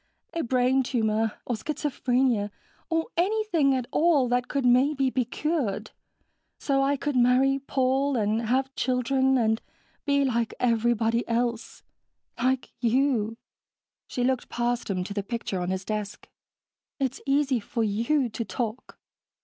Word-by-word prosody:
A 335 - -1
brain 255 +1 +2
tumor. 220 -3 0
Or 245 - -1
schizophrenia. 255 -4 0 0.4
Or 325 -1 0
anything 355 -7 +2
at 255 -2 -2
all 305 -6 +3
that 245 0 +1
could 275 -3 -1
maybe 265 +2 +3
be 255 -2 0
cured, 275 -5 -2 0.7
so 275 -2 +1
I 280 +1 +2
could 290 0 -2
marry 255 +2 +4
Paul 270 +1 0
and 220 +1 0
have 265 +3 +1
children 260 +1 +1
and 220 -2 +1 0.5
be 280 -1 +3
like 235 -3 -1
everybody 235 -1 +2
else. 235 0 -2 0.6
Like 255 +1 0
you." 235 -2 +1 0.7
She 245 - -2
looked 255 0 0
past 240 0 -1
him 185 -2 -1
to 200 - -6
the 200 - -1
picture 200 -3 -4
on 180 - -2
his 190 0 -3
desk. 210 -1 -4 0.7
"It's 265 -1 -2
easy 275 -2 +2
for 230 +2 -2
you 235 +7 +1
to 230 +1 -4
talk." 235 0 -5
250 Hz, 140 wpm, -26 LUFS, 230-270 Hz, 0.7 s, marry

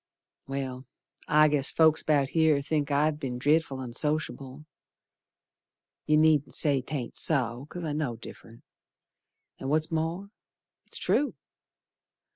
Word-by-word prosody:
Well, 135 -2 -5 0.4
I 155 +1 +5
guess 145 -2 +2
folks 160 -1 +4
about 145 -3 +2
here 160 -3 +3
think 145 0 -1
I've 150 +1 +1
be'n 130 -4 -4
dret'ful 145 +1 +1
onsociable. 135 +2 -4 1.4
You 150 - +4
needn't 155 -2 +3
say 140 -3 +2
'taint 130 -2 -5
so, 130 -3 -1
'cause 175 - -7
I 155 -2 -2
know 145 -6 -2
diff'rent. 115 0 -13 1.0
An' 135 - -4
what's 155 +2 0
more, 165 +5 -2 0.6
it's - - -4
true. 290 - +1
150 Hz, 120 wpm, -28 LUFS, 135-155 Hz, 1.4 s, I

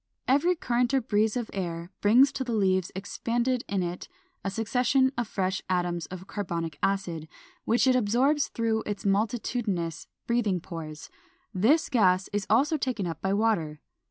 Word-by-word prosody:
Every 290 +8 +3
current 245 -3 0
or 265 - +3
breeze 220 -1 +1
of 240 -2 -4
air 170 -2 -4
brings 245 +7 +6
to 265 - -3
the 245 -2 -3
leaves 190 -3 +1
expanded 235 +5 -1
in 195 -2 0
it 175 +1 -5 0.4
a 195 - -1
succession 250 +5 +2
of 240 -2 -2
fresh 190 -2 -1
atoms 175 -2 -1
of 185 0 -8
carbonic 170 -6 -4
acid, 180 -5 -1 0.4
which 235 +4 +3
it 260 -1 +4
absorbs 255 +6 +2
through 225 -1 -1
its 205 +1 -4
multitudinous 200 -5 -1 0.2
breathing 220 -6 +1
pores. 155 -3 -8 0.4
This 230 - +3
gas 190 -7 +3
is 205 -1 -1
also 275 +9 +3
taken 255 -8 -2
up 165 -3 -5
by 190 0 0
water. 200 -8 0
205 Hz, 155 wpm, -27 LUFS, 185-240 Hz, 0.4 s, brings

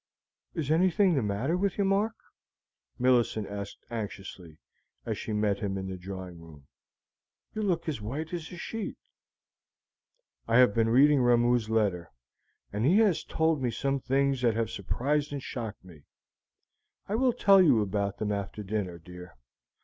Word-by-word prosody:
"Is 155 -4 -2
anything 185 +3 +3
the 140 - +1
matter 110 - -1
with 195 +1 -1
you, 200 - +2
Mark?" 205 +4 +1 0.8
Millicent 120 -4 +2
asked 100 -1 -7
anxiously, 95 -7 -7 0.5
as - - -2
she - - -6
met 105 -2 0
him 100 -1 -2
in 95 0 -4
the 95 - -4
drawing 90 -2 -8
room; 75 -4 -14 0.9
"you 215 - -3
look 180 -6 -1
as 145 -9 -3
white 150 +10 -5
as 165 -2 -5
a 180 - -8
sheet." 225 +4 -5 1.5
"I 115 +1 +3
have 125 -5 +6
been 115 0 +2
reading 140 +4 +5
Ramoo's 120 -2 +3
letter, 100 -6 0 0.6
and 105 +2 -1
he 170 +10 +4
has 210 -7 +3
told 160 -3 0
me 125 - 0
some 135 +3 -1
things 135 0 +1
that 115 -3 +2
have 115 0 -1
surprised 145 +9 -1
and 140 -2 -5
shocked 110 -6 -6
me. 80 -6 -15 1.0
I 200 - -3
will 250 +3 +3
tell 200 -5 +5
you 135 -11 +5
about 100 0 -2
them 105 -1 -2
after 100 +1 -4
dinner, 95 -3 -3
dear. 90 -3 -12
120 Hz, 160 wpm, -28 LUFS, 100-155 Hz, 1.5 s, have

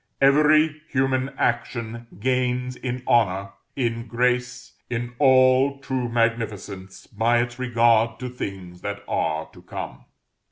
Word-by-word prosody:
Every 155 +2 +4
human 130 0 +1
action 120 -1 -2
gains 125 +1 0
in 125 0 -4
honor, 100 -4 +2 0.2
in 115 -3 -2
grace, 125 +1 -1 0.2
in 120 0 -3
all 130 0 +5
true 130 -3 -3
magnificence, 110 -5 -2
by 115 +2 +1
its 120 +1 -2
regard 115 -2 +3
to 125 - -3
things 95 -7 -7
that 100 0 -5
are 80 0 -1
to - - -14
come. - - -7
120 Hz, 120 wpm, -24 LUFS, 115-130 Hz, 0.2 s, all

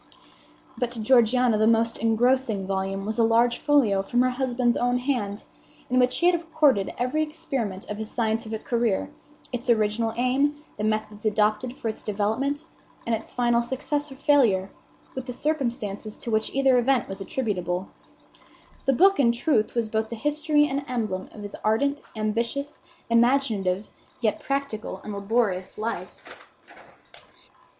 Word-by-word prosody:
But 245 -2 0
to 235 - -6
Georgiana 240 0 +4
the 215 - +4
most 230 0 +2
engrossing 230 -2 +2
volume 195 0 -2
was 220 +2 -3
a - - +5
large 235 +2 +3
folio 245 -10 +3
from 245 +5 +1
her 255 - +2
husband's 250 -2 0
own 245 0 +1
hand, 245 -6 -2 0.5
in 255 - +4
which 250 0 +2
he 345 - +1
had 350 -1 +4
recorded 305 - +2
every 255 +6 0
experiment 275 - -3
of 210 0 -5
his 220 0 -4
scientific 220 -1 -2
career, 230 -5 0 0.4
its 245 +1 -4
original 225 0 +2
aim, 265 +4 +2 0.2
the - - -3
methods 215 -1 -2
adopted 215 +3 +1
for - - -4
its 220 - -3
development, 220 +9 -1 0.4
and 230 - 0
its 225 0 -3
final 240 -1 +2
success 285 +4 -2
or - - -8
failure, 245 -10 +3 0.4
with 260 -1 -5
the 250 - -4
circumstances 235 -8 -2
to 235 - -5
which 220 0 +1
either 270 -2 +3
event 255 +1 +2
was 195 +1 -7
attributable. 185 -5 -2 1.0
The 270 - +3
book, 390 +6 +5
in 240 -4 +5
truth, 235 -2 +1
was 235 -2 +1
both 220 0 -1
the 235 - -5
history 295 +4 +2
and 280 +1 -2
emblem 215 -7 -3
of 210 - -10
his 205 - -7
ardent, 280 +7 +1
ambitious, 235 +7 -2 0.3
imaginative, 230 -6 +2 0.3
yet 225 -4 0
practical 275 -8 -3
and 210 - -6
laborious 200 -2 -1
life. 220 +2 -5
235 Hz, 155 wpm, -25 LUFS, 215-265 Hz, 1.0 s, a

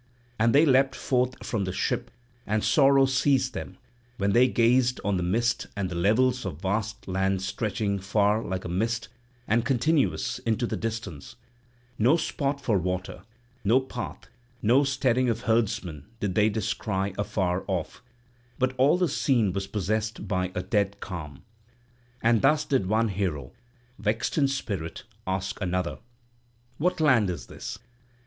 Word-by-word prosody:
And 115 +3 +3
they 150 +3 +7
leapt 135 -1 +4
forth 125 -1 -1
from 105 -5 -1
the 95 - -2
ship, - - -1 0.4
and 105 +1 0
sorrow 135 -2 +5
seized 130 -1 +2
them - - -7 0.4
when 100 0 +1
they 120 +4 +5
gazed 125 +1 +3
on 100 -2 +1
the - - -1
mist 115 +7 0
and 95 -2 -2
the - - -4
levels 125 +8 +2
of 85 -6 -5
vast 110 +4 -2
land 95 0 0
stretching 100 0 -1
far 105 +3 +1
like 95 0 -4
a - - -2
mist 110 +5 -1 0.4
and 115 +2 +2
continuous 135 0 +1
into 115 +1 0
the - - -2
distance; 110 -10 -5 0.6
no 125 +9 +5
spot 140 -3 -2
for 115 -8 +1
water, 90 +1 -3 0.4
no 115 +6 +4
path, 130 -2 -7 0.4
no 125 +6 +5
steading 130 -2 +1
of 115 0 -1
herdsmen 100 - -1
did 100 -3 -1
they 105 +3 +4
descry 100 -2 -2
afar 95 -3 -1
off, 90 -5 -3 0.6
but 130 0 +1
all 140 +6 +5
the 180 -1 +2
scene 115 - +1
was 100 0 -3
possessed 110 +2 -2
by 95 -2 -1
a 90 - -2
dead 100 +1 0
calm. 75 -8 -7 0.8
And 115 -1 +4
thus 150 +2 +3
did 130 -11 +1
one 110 +2 +2
hero, 90 -9 -2 0.5
vexed 110 +1 -1
in 145 -3 +3
spirit, 100 -11 -4 0.2
ask 95 +2 -2
another: 90 -1 -1 0.8
"What 180 +3 +1
land 130 -10 +4
is 90 - -4
this? - - -7
110 Hz, 155 wpm, -27 LUFS, 95-130 Hz, 0.8 s, they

